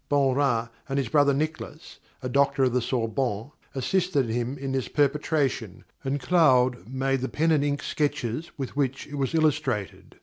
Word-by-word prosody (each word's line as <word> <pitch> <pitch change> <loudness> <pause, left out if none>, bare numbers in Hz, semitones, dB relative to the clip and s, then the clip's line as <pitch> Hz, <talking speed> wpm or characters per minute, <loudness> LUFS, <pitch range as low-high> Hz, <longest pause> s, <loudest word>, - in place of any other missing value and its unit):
Beaurain 135 -4 +2 0.2
and 135 - -1
his 135 -5 0
brother 145 0 +4
Nicholas, 155 +2 -4 0.2
a - - -1
doctor 140 +1 +2
of 125 -2 +2
the 125 - +2
Sorbonne, 115 0 -1 0.2
assisted 145 - +1
him 120 +4 -2
in 135 0 -4
this 135 -2 -1
perpetration, 140 - 0 0.2
and 135 +1 -1
Claude 130 -6 +3
made 135 0 0
the 130 - -2
pen 165 +2 +1
and 150 -3 +3
ink 145 -1 -1
sketches 145 0 -2
with 135 -2 -5
which 135 -2 -1
it - - -13
was 135 +4 -1
illustrated. 150 -10 0
135 Hz, 165 wpm, -26 LUFS, 125-145 Hz, 0.2 s, brother